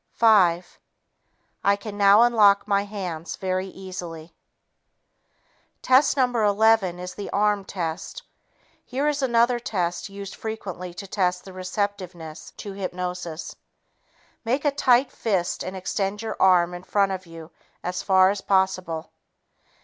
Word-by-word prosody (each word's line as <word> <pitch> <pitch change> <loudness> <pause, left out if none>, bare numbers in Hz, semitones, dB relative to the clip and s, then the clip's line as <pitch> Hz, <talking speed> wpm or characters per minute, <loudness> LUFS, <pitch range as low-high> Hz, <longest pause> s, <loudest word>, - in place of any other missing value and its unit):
Five... 180 -6 +3 0.8
I 200 0 +4
can 205 0 -8
now 205 +2 +6
unlock 210 -4 +4
my 200 0 +1
hands 180 -5 -5
very 185 0 -2
easily." 175 -4 -8 1.5
Test 265 +3 +4
No. 260 - +5 0.2
11 210 -3 +3
is 180 0 -7
the 205 - -7
"arm" 205 0 +1
test. 185 - -5 0.6
Here 270 +4 -2
is 295 -1 0
another 240 -1 +3
test 180 -6 -2
used 200 -1 -8
frequently 195 -5 -6
to 195 - -7
test 180 -2 -1
the 190 - -10
receptiveness 185 -4 -5
to 200 - -7
hypnosis. 180 -3 -5 0.9
Make 255 +6 -1
a 290 - +4
tight 255 -2 +3
fist 190 -6 -1
and 185 +1 -6
extend 195 +3 -2
your 220 -1 -4
arm 180 -2 +4
in 175 - -7
front 195 +1 +1
of 185 -1 -5
you 165 0 -11 0.3
as 180 +1 -3
far 190 -1 +5
as 200 -1 -4
possible. 185 -5 0
195 Hz, 135 wpm, -24 LUFS, 180-210 Hz, 1.5 s, now